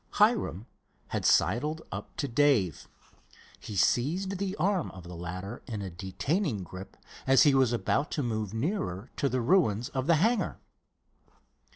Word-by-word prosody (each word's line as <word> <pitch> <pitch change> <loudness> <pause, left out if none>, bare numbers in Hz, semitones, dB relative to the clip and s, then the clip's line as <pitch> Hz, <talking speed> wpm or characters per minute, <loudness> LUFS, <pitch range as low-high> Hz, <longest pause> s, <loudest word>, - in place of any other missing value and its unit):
Hiram 210 - +2 0.4
had - - 0
sidled 150 +8 +2
up - - -7
to 140 - -1
Dave. 120 - +2 0.7
He 105 - -8
seized 175 - +1
the 195 -1 -2
arm 195 -3 0
of 95 - -11
the 90 +1 -9
latter 90 +6 -6
in 110 -4 -4
a 95 - -5
detaining 105 - -2
grip 95 +2 -10 0.3
as 135 -1 +6
he 145 - +5
was 130 -3 +4
about 130 +5 0
to 145 - -1
move 110 -4 -2
nearer 115 - -3
to 140 - +1
the 130 -1 0
ruins 120 - +2
of 130 +1 -3
the 170 - +5
hangar. 220 +9 +1
130 Hz, 155 wpm, -29 LUFS, 100-160 Hz, 0.7 s, as